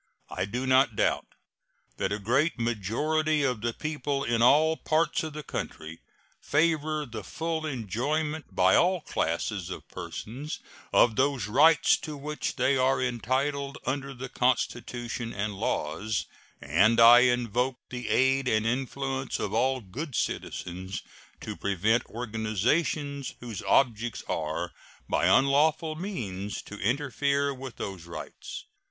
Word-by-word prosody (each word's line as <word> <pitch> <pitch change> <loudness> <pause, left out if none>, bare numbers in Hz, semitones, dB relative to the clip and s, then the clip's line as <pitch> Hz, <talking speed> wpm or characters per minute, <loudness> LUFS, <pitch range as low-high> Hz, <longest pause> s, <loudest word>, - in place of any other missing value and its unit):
I 95 - -1
do 125 +6 -3
not 130 -3 +4
doubt - - +1 0.7
that 95 - -1
a 100 - 0
great 130 - +1
majority 145 +8 0
of 125 -5 0
the 120 +1 0
people 145 0 -2
in 115 -2 +1
all 155 +6 +5
parts 155 +2 +1
of 155 -1 -5
the 150 0 -6
country 80 - -6 0.4
favor 155 -1 +1
the 115 -5 -7
full 160 +5 -3
enjoyment 150 - -2
by 95 0 +5
all 180 0 +3
classes - - -2
of - - -7
persons 135 +8 -6 0.3
of 115 -3 +4
those 135 -5 +2
rights 150 +9 +5
to 155 -2 -7
which 150 +2 -4
they 135 - +2
are 130 +1 +3
entitled 135 +3 -1
under 135 +1 -2
the 130 +2 -6
Constitution 120 -1 -1
and 105 +1 -2
laws, 100 +3 -2 0.3
and 100 +11 +3
I 120 +1 +10
invoke 125 +1 +1
the 125 -2 -5
aid 130 +1 +3
and 110 -2 +2
influence 135 +2 -2
of - - -3
all 130 +1 +2
good 130 - -6
citizens 95 +1 -3 0.4
to - - -5
prevent 100 +4 +1
organizations 125 - -1
whose 115 -6 -6
objects 120 -3 +1
are 80 +2 -2 0.4
by - - +2
unlawful 155 +4 +3
means 105 - -4
to 105 - -10
interfere 140 +4 0
with 130 -2 -8
those 95 -4 -6
rights. 85 - -8
130 Hz, 135 wpm, -28 LUFS, 110-145 Hz, 0.7 s, I